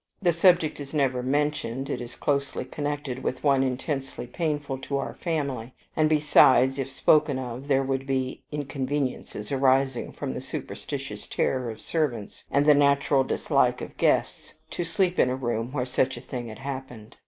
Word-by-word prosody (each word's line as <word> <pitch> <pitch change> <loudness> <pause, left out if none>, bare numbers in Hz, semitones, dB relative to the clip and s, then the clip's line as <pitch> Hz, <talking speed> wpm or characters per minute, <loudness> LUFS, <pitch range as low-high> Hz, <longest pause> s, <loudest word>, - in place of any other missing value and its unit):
The 175 -4 +2
subject 170 -3 +4
is 145 +1 -7
never 130 -4 +1
mentioned: 140 -1 -1
it 140 - -3
is 120 0 -8
closely 140 -1 -1
connected 145 -3 -4
with 130 - -3
one 140 -2 +4
intensely 135 +1 -2
painful 145 0 -2
to 140 +1 -2
our 140 - -3
family, 140 -8 -3 0.2
and 155 -1 +3
besides, 135 -3 +5
if 135 0 -2
spoken 145 +1 +3
of, 130 +1 -6
there 135 -1 +3
would 135 0 -2
be 130 -1 -1
inconveniences 135 -6 -3
arising 135 -1 +2
from - - -4
the 65 - -5
superstitious - - -6
terrors 125 -3 -1
of - - -16
servants, 130 -11 -2
and 140 +1 +2
the 150 - +8
natural 140 -1 +3
dislike - - +1
of - - -8
guests - - +1 0.2
to 175 - -2
sleep 175 +2 0
in 125 - +5
a 130 - 0
room 120 -2 -2
where 130 -3 -1
such 130 0 0
a - - -8
thing 125 -2 -6
had 110 - -8
happened. 130 -5 -7
135 Hz, 170 wpm, -26 LUFS, 130-145 Hz, 0.2 s, the